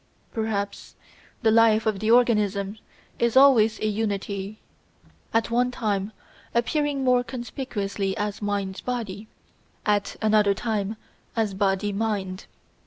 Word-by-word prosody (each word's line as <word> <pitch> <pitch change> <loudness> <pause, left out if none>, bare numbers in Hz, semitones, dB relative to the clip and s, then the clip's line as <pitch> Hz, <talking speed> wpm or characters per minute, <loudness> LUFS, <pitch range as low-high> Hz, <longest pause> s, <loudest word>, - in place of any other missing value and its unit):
Perhaps 210 -3 -3 0.5
the 220 - +5
life 225 -1 +5
of 215 -3 0
the 215 - -1
organism 210 -4 +2 0.4
is 235 +1 +2
always 245 -6 +6
a - - 0
unity, 205 -1 -2 0.7
at 225 0 +1
one 245 +1 +2
time 210 -4 -2 0.4
appearing 280 +3 +1
more 250 -1 +3
conspicuously 220 -6 -4
as 210 -1 -3
Mind 200 -2 -2
body, 220 -4 -4 0.6
at 205 -1 +1
another 210 -2 +3
time 215 -1 -2 0.4
as 220 -3 0
Body 195 +1 0
mind. 195 -3 -2
215 Hz, 115 wpm, -25 LUFS, 200-230 Hz, 0.7 s, always